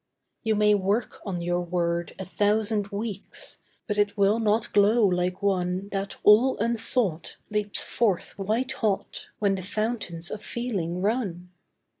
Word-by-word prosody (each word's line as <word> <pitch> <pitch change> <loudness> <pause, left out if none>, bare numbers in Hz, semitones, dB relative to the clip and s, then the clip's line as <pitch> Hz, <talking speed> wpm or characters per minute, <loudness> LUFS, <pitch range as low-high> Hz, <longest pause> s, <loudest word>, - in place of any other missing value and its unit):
You 220 -1 +1
may 210 0 +4
work 205 +4 0
on 175 -3 -3
your 175 +1 0
word 170 -1 -1
a 190 - -5
thousand 210 +1 +1
weeks, 200 0 -5 0.3
But 210 -2 -2
it 205 0 +1
will 200 +3 +3
not 220 0 +1
glow 210 +3 +5
like 180 +1 0
one 185 0 0
That 195 0 -3
all 235 +6 +6
unsought, 225 -5 0
leaps 210 -1 -1
forth 210 -7 0
white 225 +7 0
hot, 215 -6 -2
When 200 -2 +2
the 190 - -3
fountains 200 -4 -3
of 215 - -5
feeling 190 -8 -3
run. 195 -6 -1
205 Hz, 145 wpm, -26 LUFS, 185-220 Hz, 0.3 s, all